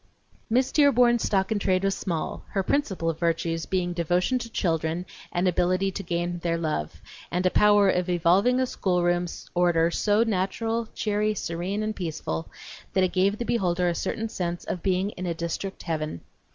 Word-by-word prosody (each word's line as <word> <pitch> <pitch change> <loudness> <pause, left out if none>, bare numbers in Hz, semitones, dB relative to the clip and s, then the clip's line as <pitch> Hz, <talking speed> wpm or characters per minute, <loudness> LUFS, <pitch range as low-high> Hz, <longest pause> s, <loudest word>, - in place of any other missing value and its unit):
Miss 250 +3 +2
Dearborn's 250 -5 +4
stock 190 -1 +1
in 215 - +1
trade 185 -1 +1
was 195 0 +2
small, 170 -6 -3
her 195 -2 +1
principal 190 - 0
virtues 165 0 -1
being 180 -2 0
devotion 175 +8 +1
to 235 - -6
children 165 -4 -1 0.3
and 175 +2 +1
ability 185 +2 +1
to 195 - -5
gain 175 -1 -2
their 170 0 -1
love, 155 - -3 0.3
and 180 +2 -1
a 185 - +4
power 205 -1 +5
of 180 -1 +1
evolving 185 +8 +3
a 260 - +3
schoolroom 175 -5 0 0.3
order 170 -1 +3
so 210 +4 +2
natural, 225 +2 -1
cheery, 210 0 0
serene, 180 +4 -3
and 215 0 -2
peaceful 155 - -4 0.4
that 190 - +3
it 185 - 0
gave 195 +3 +2
the 235 - -3
beholder 180 -6 +1
a 175 - +2
certain 225 +6 -2
sense 175 -5 -3
of 180 - -4
being 190 +2 0
in 185 -2 -6
a 170 - -1
district 170 +4 -4
heaven. 155 - -3
185 Hz, 175 wpm, -26 LUFS, 170-210 Hz, 0.4 s, power